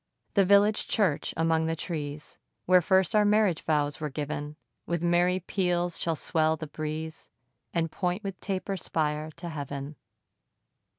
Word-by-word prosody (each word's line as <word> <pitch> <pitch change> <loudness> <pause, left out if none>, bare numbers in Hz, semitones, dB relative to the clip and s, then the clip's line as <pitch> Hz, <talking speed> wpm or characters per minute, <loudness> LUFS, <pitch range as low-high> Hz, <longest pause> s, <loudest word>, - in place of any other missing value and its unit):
The 200 -2 +4
village 205 +2 +4
church, 190 -9 +1
among 160 0 +2
the 165 - 0
trees, 150 -3 -5 0.3
Where 185 0 +6
first 190 +4 +3
our 210 - +6
marriage 205 -5 +3
vows 145 -2 0
were 150 - -2
giv'n, 145 +1 -4 0.3
With 170 -1 -1
merry 175 +2 +3
peals 175 -1 0
shall 165 -1 0
swell 160 +1 +1
the 155 - -5
breeze, 155 +1 -5 0.4
And 165 -2 -1
point 180 +3 -2
with 195 -2 -5
taper 195 0 -3
spire 155 -2 -1
to 170 0 -6
heav'n. 145 -1 -5
165 Hz, 145 wpm, -28 LUFS, 155-185 Hz, 0.4 s, Where